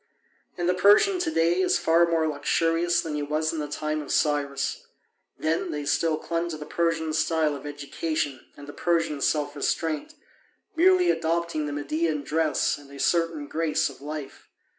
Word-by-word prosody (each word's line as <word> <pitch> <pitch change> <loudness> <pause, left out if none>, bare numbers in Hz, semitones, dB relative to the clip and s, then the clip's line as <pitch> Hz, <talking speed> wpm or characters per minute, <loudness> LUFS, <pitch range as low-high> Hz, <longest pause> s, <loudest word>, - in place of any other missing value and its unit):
And 175 -1 -1
the 180 - +3
Persian 210 - +5
to 355 -2 0
day 170 - +2
is 185 - +3
far 170 +1 +3
more 165 -1 +1
luxurious 165 +4 +1
than 160 - -5
he 150 - -2
was 155 +2 -1
in 160 - -3
the 150 - -3
time 155 +1 -3
of 145 - -7
Cyrus. 145 -2 0 0.5
Then 160 +1 -1
they 150 -1 -4
still 155 +2 +1
clung 170 +2 -2
to 155 - -5
the 150 - -8
Persian 165 -1 -1
style 160 -1 +1
of 140 +1 -8
education 145 -1 -3
and 145 - -10
the 145 - -9
Persian 165 -4 0
self 145 0 0
restraint, 155 +1 -2 0.6
merely 360 +1 +5
adopting 165 -2 -1
the - - -4
Median 150 +1 -1
dress 155 -1 0
and 140 -1 -15
a 140 0 -11
certain 165 -3 +1
grace 160 0 0
of - - -16
life. 150 -1 -7
155 Hz, 175 wpm, -26 LUFS, 145-170 Hz, 0.6 s, Persian